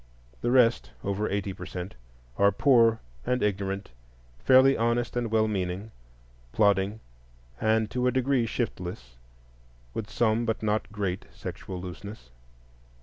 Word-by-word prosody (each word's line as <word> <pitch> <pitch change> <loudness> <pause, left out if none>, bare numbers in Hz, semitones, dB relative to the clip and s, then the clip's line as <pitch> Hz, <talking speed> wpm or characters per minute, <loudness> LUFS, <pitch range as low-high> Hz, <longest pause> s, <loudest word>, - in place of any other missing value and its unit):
The - - 0
rest, 115 - +4
over 100 +2 -1
eighty 100 -1 -2
per 90 -1 -8
cent, 90 0 -6 0.5
are 100 0 +6
poor 115 -5 +4 0.2
and 125 0 0
ignorant, 100 -2 -2 0.5
fairly 130 - +6
honest 120 +1 0
and 120 -2 -1
well 110 0 +3
meaning, 95 +1 -3 0.6
plodding, 100 0 +2 0.6
and 110 0 +2
to 125 +1 0
a - - +3
degree 130 -1 +1
shiftless, 90 - -4 0.8
with 110 -1 -4
some 110 +1 +1
but 115 -1 -2
not 105 -1 0
great 100 -3 -3
sexual 95 -2 -7
looseness. 90 - -9
105 Hz, 130 wpm, -27 LUFS, 95-115 Hz, 0.8 s, are